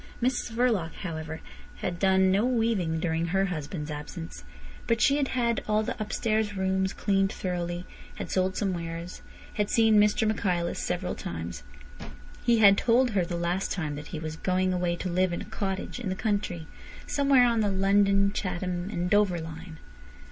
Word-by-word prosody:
Mrs 245 -1 -1
Verloc, 225 -9 +1
however, 160 -2 -5 0.3
had 175 -2 -4
done 190 -1 +4
no 200 +3 +3
weaving 225 -10 +1
during 165 0 0
her 195 +3 +2
husband's 155 -3 -4
absence. 150 +3 -7 0.4
But 230 -1 +2
she 275 +3 +4
had 280 -2 +1
had 235 -3 0
all 215 0 +2
the - - -3
upstairs 215 -1 -1
room 190 0 +1
cleaned 195 0 +1
thoroughly, 175 -1 -3 0.3
had - - -6
sold 185 0 +1
some 195 -3 0
wares, 170 +1 -6 0.3
had 210 -1 -1
seen 225 -2 +5
Mr 210 +1 +3
Michaelis 180 -5 0
several 180 0 -2
times. 85 - -6 0.8
He 235 -1 +4
had 200 -2 +7
told 245 +1 +3
her 195 -4 +2
the 170 0 -3
last 175 +3 -1
time 155 -6 -2
that 145 +1 -7
he 165 - -6
was 155 0 -5
going 185 +1 +1
away 175 -1 0
to 185 - -4
live 180 0 +1
in - - -3
a - - -10
cottage 195 +3 -4
in 230 -6 -3
the 185 - -1
country, 200 -6 -2 0.4
somewhere 275 -3 +4
on 235 -2 +2
the 210 -2 +2
London, 195 0 +3
Chatham, 180 -1 -3
and 175 -4 -2
Dover 200 -3 +3
line. 160 +1 -8
190 Hz, 175 wpm, -28 LUFS, 175-210 Hz, 0.8 s, had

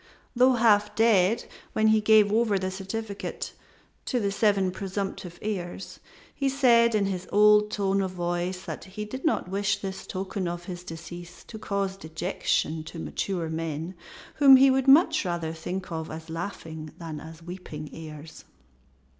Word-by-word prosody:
Though 255 +2 +5
half 210 -3 +3
dead 220 -1 +3 0.3
when, 220 0 +3
he 215 0 +4
gave 210 -1 +5
over 220 -3 +3
the 185 0 -2
certificate 200 +2 -5 0.5
to 250 - 0
the 200 -3 0
seven 200 -3 +2
presumptive 190 -2 -5
heirs 190 -3 -5 0.3
he 275 -1 0
said 235 -4 +4
in 205 -2 +2
his 185 -2 -3
old 210 0 +5
tone 195 -2 0
of 190 - -1
voice 175 +1 -3
that - - -7
he 210 +3 -6
did 260 +5 -7
not 320 - +1
wish 200 +1 0
this 190 -1 -6
token 190 0 -3
of 175 0 -4
his 180 -1 -7
decease 175 +1 -9
to 220 - -10
cause 200 -2 -2
dejection 160 -2 -2
to 165 - -9
mature 170 +1 -3
men 160 +1 -4 0.4
whom 275 -2 +9
he 265 +1 +7
would 265 0 +1
much 310 +2 +6
rather 170 -3 -2
think 180 +4 -5
of 160 -1 -4
as 160 +1 -8
laughing 160 -3 -6
than 160 -3 -6
as 160 +2 -11
weeping 165 -4 -8
heirs. 155 -1 -10
190 Hz, 160 wpm, -27 LUFS, 175-215 Hz, 0.5 s, whom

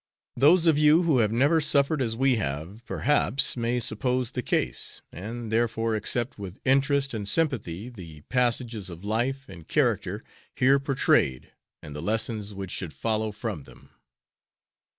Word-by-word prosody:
Those 160 +7 +5
of 160 -3 +4
you 155 +3 +5
who 155 -7 +3
have 110 -2 +2
never 145 +8 +3
suffered 140 0 +2
as 115 -3 -1
we 130 0 +2
have, 85 +5 -4
perhaps 140 -1 +1
may 120 0 0
suppose 125 +2 -1
the - - -3
case, - - -1
and 110 +5 -6
therefore 115 0 0
accept 120 +3 -2
with 100 0 -8
interest 140 +1 +2
and 105 -3 -3
sympathy 115 - -1
the 85 -11 -11
passages 120 - -1
of 85 +2 -10
life 130 +6 -1
and 85 -8 -12
character - - 0 0.3
here 135 +2 +4
portrayed 135 - +1 0.3
and 75 - -9
the 75 - -5
lessons 110 +2 -2
which 95 -2 -7
should 90 -5 -5
follow 110 -1 -1
from 105 - -5
them. - - -17
115 Hz, 150 wpm, -26 LUFS, 105-135 Hz, 0.3 s, Those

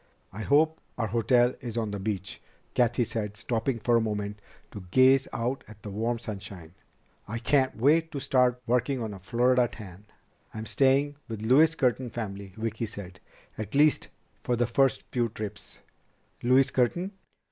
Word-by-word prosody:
"I 105 - -6
hope 155 +6 +3 0.2
our 115 - 0
hotel 120 +3 +3
is 120 -2 -6
on 110 -3 -1
the 100 - -4
beach," 95 -2 -4 0.3
Cathy 120 0 +2
said, 105 -2 -4
stopping 115 +3 -1
for 120 +1 +1
a 115 - +4
moment 105 -1 -3 0.3
to 100 -4 -9
gaze 130 +5 +5
out 125 +4 -2
at 105 -1 -15
the 105 - -6
warm 115 +4 -1
sunshine. 95 -7 -8 0.5
"I 110 +3 -4
can't 130 +2 +1
wait 160 +7 +3
to 140 - -3
start 125 -2 +2
working 125 +3 +1
on 110 -3 -4
a 95 - -9
Florida 125 +4 +2
tan." 100 -3 -11 0.5
"I'm 110 0 -5
staying 140 +3 +2
with 110 -2 -6
Louise 150 +8 +5
Curtin's 125 -3 0
family," 100 -4 -5
Vicki 115 0 -3
said. 95 -3 -9 0.4
"At 110 +4 -5
least 150 +1 +4 0.4
for 125 - +1
the 120 +1 +1
first 135 +3 +2
few 120 -2 0
trips." 105 -1 -7 0.6
"Louise 130 +2 +4
Curtin?" 170 - 0
115 Hz, 165 wpm, -28 LUFS, 105-130 Hz, 0.6 s, gaze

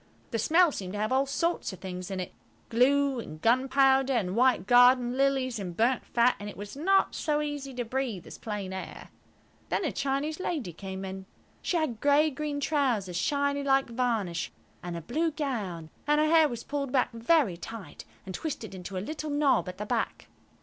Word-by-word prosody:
The 230 - -1
smell 335 - +4
seemed 190 -7 -6
to 205 - -3
have 215 +2 -1
all 265 +1 +2
sorts 335 +2 -1
of 190 - -9
things 180 0 -6
in 190 -1 -3
it–glue 260 +8 0
and 155 -9 -8
gunpowder, 265 - +3
and 195 -6 0
white 250 -4 +3
garden 245 +1 +5
lilies 265 -3 +1
and 180 -3 -6
burnt 240 +3 +1
fat, 240 +1 +3
and 205 0 -6
it - - -10
was 205 +4 -8
not 385 +7 +2
so 300 -1 0
easy 290 -2 -4
to 245 -1 -2
breathe 240 -6 -3
as - - -10
plain 205 -4 -4
air. 190 - -7 0.6
Then 385 - 0
a 300 - 0
Chinese 280 +4 -2
lady 290 - -3
came 190 +2 -6
in. 190 0 -7 0.3
She 355 - 0
had 270 -9 -2
green 290 +1 +4
grey 290 +1 -3
trousers, 255 - 0
shiny 280 +8 0
like 270 -3 +2
varnish, 225 -8 -1 0.3
and 175 -1 -5
a - - -5
blue 310 - 0
gown, 210 - -4 0.2
and 295 0 +4
her 305 - +4
hair 315 -1 +5
was 235 -1 -6
pulled 280 -2 -3
back 255 -2 +2
very 230 - +2
tight, 195 -1 -9 0.2
and 190 - -6
twisted 230 - -5
into 185 0 -6
a 185 - -3
little 310 +2 -5
knob 285 -8 +2
at 180 - -8
the 210 - -4
back. - - -2
250 Hz, 190 wpm, -28 LUFS, 200-285 Hz, 0.6 s, garden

